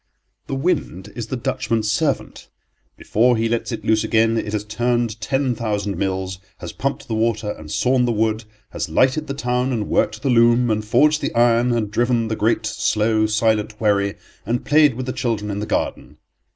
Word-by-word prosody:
The 135 - -3
wind 105 - -2
is 115 -2 -5
the 130 - -3
Dutchman's; 110 -2 -1
servant 140 +5 -2 0.5
before 120 +2 +2
he 115 +1 +1
lets 115 0 -2
it - - -5
loose 110 0 +2
again 115 0 +2
it 110 -2 -2
has 105 -1 -2
turned 120 +1 -1
ten 135 +5 0
thousand 105 -3 -2
mills, 95 0 -3 0.2
has 85 -3 -7
pumped 140 +1 -3
the 115 - -3
water 110 -1 0
and 80 -5 -10
sawn 125 +9 +2
the 120 - +1
wood, 110 0 0 0.3
has - - -4
lighted 130 - +2
the 140 - -4
town 125 0 -1
and 110 -4 -2
worked - - 0
the 140 - +1
loom, 120 0 +4
and 110 0 -1
forged 150 +8 +3
the - - -3
iron, 120 +1 +3
and 110 -3 -1
driven 120 0 +1
the 110 - -1
great, 110 +1 0
slow, 110 0 +1
silent 110 0 0
wherry, 100 -2 +1 0.3
and 120 +3 -2
played 150 -4 +4
with 130 +1 -4
the 130 - -3
children 110 -5 -2
in 100 - -3
the 105 - -4
garden. - - -3
115 Hz, 190 wpm, -21 LUFS, 105-125 Hz, 0.5 s, loom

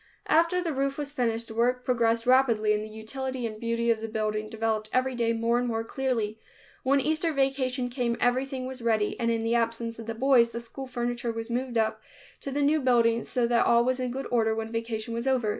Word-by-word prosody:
After 335 +3 +3
the 330 -3 -2
roof 275 0 -1
was 290 -1 -4
finished, 230 -4 0
work 245 +2 0
progressed 230 -2 +1
rapidly 240 -5 +4
and 210 0 -1
the 215 - -8
utility 250 +4 -4
and 215 -1 -5
beauty 230 0 0
of 220 -1 -1
the 225 - -3
building 215 -1 -2
developed 220 -1 -2
every 255 +1 +1
day 235 -2 +1
more 230 +1 +1
and 245 - -1
more 225 -1 -1
clearly. 225 -4 -2 0.4
When 275 +2 +3
Easter 315 +4 +1
vacation 270 -3 0
came 245 -2 -1
everything 255 +1 0
was 260 -1 -6
ready, 220 -3 +1
and 230 -1 +1
in 230 -1 0
the 230 +1 0
absence 230 0 -1
of 225 - -8
the 225 - -3
boys, 245 -1 +4
the 235 - -5
school 250 +3 -8
furniture 240 -1 -2
was 225 +1 -5
moved 245 0 -2
up 220 -1 0 0.4
to - - -6
the 285 +1 0
new 300 +2 +3
building 235 -3 +3
so 245 -2 0
that 235 0 +2
all 235 0 +4
was 255 0 0
in 255 -1 -1
good 265 +3 -4
order 225 -2 +2
when 225 0 -4
vacation 230 0 -3
was 235 +3 -3
over. 250 -5 +2
235 Hz, 225 wpm, -27 LUFS, 225-260 Hz, 0.4 s, rapidly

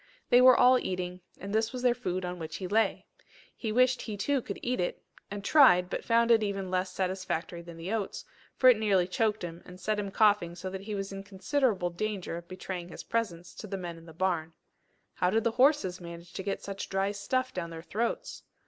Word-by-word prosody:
They 245 - +8
were 255 0 +8
all 250 +1 +7
eating, 180 -2 -4 0.2
and 200 +1 -6
this 220 +1 +1
was 255 -1 -5
their 245 -1 +5
food 185 -7 -3
on 180 0 -5
which 160 -1 -6
he 185 - -4
lay! 215 +1 +1 0.5
He 220 - -3
wished 255 +2 +3
he 215 -3 -5
too 275 +6 +1
could - - -6
eat 250 +1 -1
it 175 - -1 0.3
and 205 0 -6
tried, 180 - +6
but - - -3
found 235 0 +3
it 225 -1 +6
even 195 -3 -2
less 185 0 0
satisfactory 185 -2 -3
than 170 -1 -11
the 175 +6 -4
oats, 210 -4 -3 0.3
for 255 - +5
it 245 -4 +7
nearly 195 -5 +3
choked 215 +2 0
him, 170 -1 -6
and 180 0 -12
set 215 +2 -1
him 200 -1 -3
coughing 200 -4 +3
so 185 +2 -6
that 190 0 -5
he 210 +1 -5
was 195 0 -4
in 195 0 -6
considerable 195 -1 0
danger 195 -1 -3
of 170 0 -8
betraying 185 -1 -6
his - - -8
presence 180 -7 -3
to 215 - -8
the 195 -1 -4
men 175 -2 -5
in 165 - -16
the - - -10
barn. 165 -1 -1 0.6
How 180 - +1
did 220 +3 +2
the 230 - +2
horses 250 - +3
manage 170 0 -10
to - - -4
get 195 +1 -3
such 195 0 -5
dry 195 +1 0
stuff 255 +6 -1
down 170 -2 -4
their 165 -1 -8
throats? 235 - -3
195 Hz, 225 wpm, -29 LUFS, 180-225 Hz, 0.6 s, They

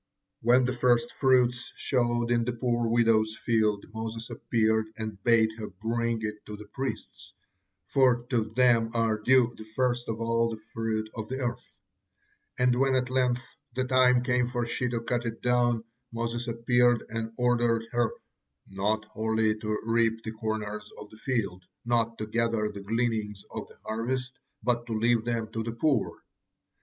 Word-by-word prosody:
When 125 +2 +5
the 130 +1 -1
first 120 -1 +2
fruits 125 -2 +2
showed 120 -2 0
in 120 -1 +3
the 125 - -1
poor 120 -1 0
widow's 115 -2 +3
field, 110 -3 +1
Moses 115 +1 -5
appeared 110 -1 +1
and 110 -3 -6
bade 115 -2 +4
her 105 - -4
bring 115 0 -1
it 105 -1 -4
to 105 - -6
the 105 - -10
priests, 130 +6 -6 0.5
for 125 -1 +3
to 115 -4 +2
them 120 -3 +4
are 115 -2 +1
due 120 +1 +4
'the - - -9
first 120 -2 0
of 110 0 -3
all 115 0 +1
the 110 -1 -6
fruit 110 -1 -1
of 110 -1 -6
the 130 - -3
earth'; 125 -2 -4 0.9
and 125 0 +3
when 135 0 +3
at 130 0 0
length 125 -1 +1 0.3
the 130 - +1
time 130 -1 +4
came 125 -1 +2
for 120 -1 -2
he 120 +1 -1
to 120 -1 -2
cut 120 0 -1
it 115 -1 -4
down, 120 -2 +2 0.3
Moses 115 +1 -3
appeared 120 0 +3
and 115 0 -3
ordered 120 -2 +2
her 120 -1 +1 0.6
'not 105 +3 -1
wholly 110 0 0
to 110 0 -1
reap 115 0 +1
the 110 - -4
corners 105 -1 -4
of 105 0 -10
the 110 - -14
field, 100 -8 -2 0.2
not 115 -1 +1
to 110 - -3
gather 115 -1 0
the 100 -1 -8
gleanings 110 -1 -1
of - - -5
the - - -18
harvest, 125 +3 -3 0.2
but 120 -1 0
to 110 -2 -1
leave 115 0 +2
them 115 -2 -1
for 115 - -2
the 115 - -3
poor.' 130 -1 0
115 Hz, 170 wpm, -28 LUFS, 110-120 Hz, 0.9 s, When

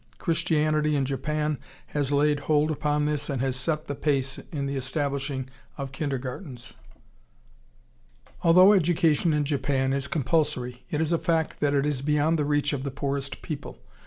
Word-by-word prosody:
Christianity 155 -2 +1
in 140 -2 +1
Japan 150 +2 -1 0.3
has 145 -2 -1
laid 145 +1 +3
hold 155 0 +3
upon 150 0 0
this 150 -1 -1
and 135 -3 -1
has 130 -1 0
set 155 +3 -2
the - - -3
pace 135 -2 -1
in 145 -4 -2
the 140 0 -2
establishing 135 0 -2 0.3
of 135 -2 -5
kindergartens.... 135 -2 -5 1.7
Although 185 +4 +7
education 165 -3 +3
in 150 -1 +1
Japan 135 -2 0
is 140 0 0
compulsory, 140 -4 -1
it 150 - -1
is 160 0 0
a 170 - +2
fact 165 -2 0
that 145 -1 +2
it 140 0 +2
is 145 -3 -1
beyond 150 +3 +2
the 150 - +1
reach 145 0 +1
of 140 - -2
the 140 - -3
poorest 140 0 -4
people. 150 -3 -6
145 Hz, 160 wpm, -26 LUFS, 135-155 Hz, 1.7 s, Although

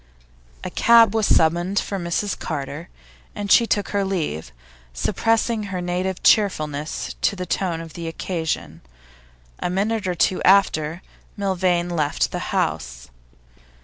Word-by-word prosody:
A - - -5
cab 230 -2 +5
was 220 -2 +1
summoned 175 +4 +2
for 200 -1 -1
Mrs 175 +3 -2
Carter, 150 +2 -5 0.5
and 205 -1 -4
she 235 - +6
took 205 -2 0
her 200 -1 0
leave, 155 - -3 0.4
suppressing 225 - 0
her 190 -2 -4
native 180 +1 -2
cheerfulness 155 -8 +1
to - - +2
the 180 -1 -5
tone 175 -1 -1
of 165 -2 -9
the 170 -1 -6
occasion. 165 -1 -4 0.8
A - - -2
minute 205 +3 -1
or 180 - -1
two 185 +2 +1
after, 175 -4 +3 0.3
Milvain 185 -3 0
left 155 -4 0
the - - -3
house. 65 -6 -2
180 Hz, 135 wpm, -22 LUFS, 160-200 Hz, 0.8 s, she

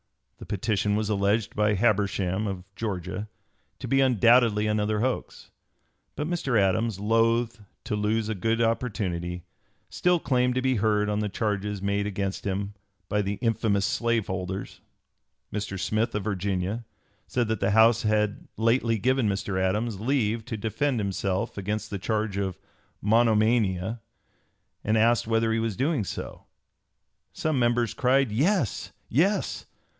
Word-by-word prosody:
The - - -10
petition 105 0 0
was 105 0 0
alleged 105 +1 +1
by 105 0 +2
Habersham, 100 -2 +1
of 95 -2 -4
Georgia, 100 -1 -4 0.5
to - - -6
be 135 0 +3
undoubtedly 115 -3 +4
another 105 0 0
hoax. 130 +1 -3 0.6
But 150 - -2
Mr. 140 -9 +1
Adams, 100 +2 +1
loath 115 +2 +2 0.2
to - - -2
lose 105 +1 0
a 110 - -1
good 115 +4 0
opportunity, 95 -7 -1 0.5
still 180 -1 +2
claimed 125 -4 +1
to 130 - +1
be 130 -2 +2
heard 105 0 +2
on 105 0 0
the 105 -1 -1
charges 105 -1 -2
made 100 0 0
against 100 -1 -3
him 100 +1 -2 0.3
by 105 - +1
the 100 0 -2
"infamous 110 -3 +1
slave 115 0 0
holders." 95 +1 -5 0.7
Mr. 100 -2 -3
Smith, 110 +6 0
of 105 - -1
Virginia, 100 +2 -2 0.4
said 120 -3 0
that 110 -2 -1
the 95 0 +1
House 110 +2 +5
had 105 -1 0
lately 115 +1 +2
given 130 0 +2
Mr. 100 -1 -1
Adams 105 +3 0
leave 115 -2 0
to 120 -3 -4
defend 115 +5 -1
himself 100 -1 -2
against 105 +2 -3
the 100 - -3
charge 105 +1 -1
of 95 -2 -2 0.5
monomania, 110 -2 +2 0.8
and 110 +2 +2
asked 115 +1 +3
whether 115 0 +2
he 115 - +1
was 115 -3 -2
doing 140 -3 +1
so. 95 - -7 0.9
Some 155 -4 -1
members 120 -2 +2
cried 130 -1 +2
"Yes! 145 - 0 0.2
Yes!" 185 - 0
110 Hz, 145 wpm, -26 LUFS, 100-115 Hz, 0.9 s, House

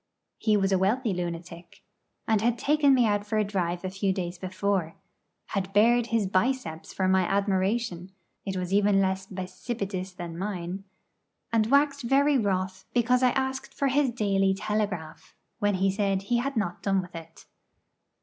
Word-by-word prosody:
He 215 -2 +3
was 195 -1 +1
a 190 - +3
wealthy 215 +3 +1
lunatic, 170 -1 -6 0.4
and 220 -2 +2
had 235 +1 +1
taken 290 0 +4
me 245 -2 +4
out 205 -1 +1
for 210 +1 -2
a 215 - +3
drive 180 -3 -2
a - - -1
few 195 0 0
days 180 -2 -4
before, 185 -2 -1 0.5
had 195 -1 -2
bared 235 +3 +4
his 230 -3 +1
'biceps' 190 -4 -1
for 190 - 0
my 190 0 +4
admiration 195 0 0 0.3
it 190 -2 -3
was 180 +1 -3
even 200 0 +4
less 190 0 0
bicipitous 190 0 -5
than 170 -1 -7
mine 190 -1 -4 0.7
and 220 -1 +3
waxed 280 +2 +3
very 275 +3 +3
wroth 190 -2 -1
because 245 +1 +3
I 255 - +5
asked 265 0 -3
for 275 - +1
his 280 0 +2
'Daily 195 -4 +1
Telegraph,' 205 -6 -3 0.2
when 205 -2 +2
he 190 +1 +2
said 195 -1 0
he 240 +4 +1
had 265 +1 -2
not 180 -5 -2
done 195 -1 +1
with 180 -2 -7
it. 165 0 -11
195 Hz, 170 wpm, -27 LUFS, 185-230 Hz, 0.7 s, I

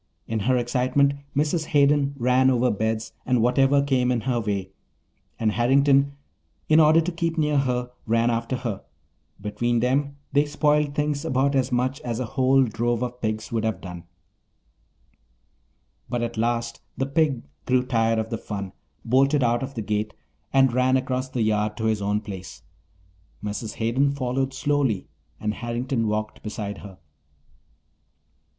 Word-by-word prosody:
In 110 0 -2
her 125 +5 +2
excitement 130 +3 +2 0.2
Mrs. 155 +3 +1
Hayden 140 -1 +3
ran 125 +1 +3
over 125 -1 +2
beds 110 +1 -2
and 125 -1 +1
whatever 135 +4 +3
came 130 -3 +1
in 120 -2 0
her 125 -1 0
way, 100 -3 -3 0.7
and 110 -2 +1
Harrington, 140 +4 +3 0.5
in 155 +1 +5
order 155 +1 +6
to 175 +3 -2
keep 165 0 -2
near 150 -2 +2
her, 125 -2 -1 0.2
ran 115 +1 +2
after 115 +2 -1
her. 115 -6 -4 0.6
Between 110 +4 -1
them 140 +4 0 0.2
they 145 +1 +3
spoiled 150 -1 +1
things 150 -1 -1
about 135 +2 +1
as 130 -2 +1
much 130 +2 0
as 120 -1 -3
a 130 - -1
whole 130 +3 +3
drove 120 +1 -1
of 125 0 -5
pigs 110 -1 -3
would 115 -2 -1
have 110 -2 -1
done. 90 -2 -9 2.0
But 120 -1 -1
at 120 0 -3
last 115 +1 -1 0.2
the 135 - 0
pig 140 -2 +1 0.2
grew 125 0 +3
tired 115 -2 +1
of 110 +1 -2
the 115 - -2
fun, 100 -3 -6 0.3
bolted 135 +4 +3
out 120 0 +2
of 135 +1 -5
the 110 - -3
gate, 105 0 -2 0.4
and 135 -2 +4
ran 130 +1 +3
across 130 0 -2
the 125 -3 -1
yard 105 0 0
to 110 - -2
his 110 -2 +1
own 105 +1 0
place. 95 -3 -9 0.8
Mrs. 105 +1 -4
Hayden 120 +5 +1
followed 135 0 -1
slowly 135 -7 0 0.3
and 105 0 -1
Harrington 120 0 -2
walked 110 0 -3
beside 105 -1 -5
her. 95 -2 -11
125 Hz, 155 wpm, -24 LUFS, 110-135 Hz, 2.0 s, order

